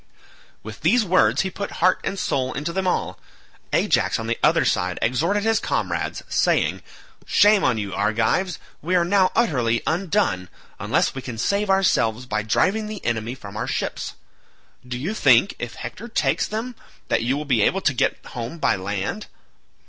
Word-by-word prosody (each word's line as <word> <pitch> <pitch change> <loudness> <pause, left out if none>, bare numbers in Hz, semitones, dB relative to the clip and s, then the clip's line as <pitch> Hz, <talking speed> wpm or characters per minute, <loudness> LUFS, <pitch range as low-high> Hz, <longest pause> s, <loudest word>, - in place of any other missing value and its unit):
With 110 0 -9
these 215 +8 +3
words 185 0 +3
he 190 - -3
put 200 +2 -5
heart 185 +2 +2
and 195 - -3
soul 130 -7 -1
into 150 +5 -3
them 190 0 -1
all. 180 - -1 0.5
Ajax - - +2
on 115 - -5
the 115 +1 -2
other - - +3
side - - 0
exhorted 165 - +1
his 225 0 +2
comrades - - -2
saying, - - +1 0.5
"Shame 205 -1 +5
on 125 -3 +2
you 100 -2 -4
Argives, 110 - 0 0.2
we 180 +4 0
are 175 -1 +3
now 190 0 +3
utterly 125 - +1
undone, 165 - 0 0.3
unless - - +1
we 135 - -6
can 125 -3 -7
save 200 - 0
ourselves 125 - +2
by 110 -3 -1
driving 195 - +1
the 215 -2 -7
enemy 115 +1 -1
from 100 -5 -11
our 120 +3 -3
ships. 125 - -3 0.7
Do 125 0 -4
you 160 +12 -3
think, 140 - +4
if 120 -1 -5
Hector 230 - -7
takes 230 - 0
them, 225 +4 -4 0.4
that - - +2
you 125 +4 0
will 150 - -4
be 125 -6 +2
able 195 - +2
to 145 - +2
get 125 - +1
home 120 +6 -6
by - - +2
land? 100 - -4
150 Hz, 175 wpm, -23 LUFS, 115-195 Hz, 0.7 s, Shame